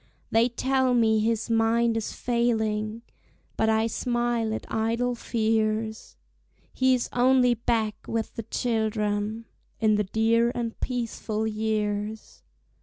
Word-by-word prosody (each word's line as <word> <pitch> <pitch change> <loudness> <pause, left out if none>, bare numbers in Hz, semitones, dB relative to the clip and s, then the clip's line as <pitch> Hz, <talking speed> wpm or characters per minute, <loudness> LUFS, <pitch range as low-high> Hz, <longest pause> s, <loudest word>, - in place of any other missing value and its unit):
They 230 +2 +4
tell 260 +1 +1
me 220 -2 +3
his 225 +1 0
mind 230 0 +2
is 225 -2 -2
failing, 225 -2 -1 0.5
But 220 - +1
I 220 0 +3
smile 240 -1 -1
at 220 - -4
idle 230 +3 0
fears; 220 - -1 0.6
He 260 0 +3
is 245 - -2
only 250 0 +4
back 220 -2 -1
with 225 -1 -2
the - - -4
children, 220 -1 -1 0.3
In 215 -2 +3
the 210 - +2
dear 230 +4 +2
and 235 -2 -4
peaceful 230 -3 -3
years. 215 -1 -2
225 Hz, 120 wpm, -26 LUFS, 220-235 Hz, 0.6 s, They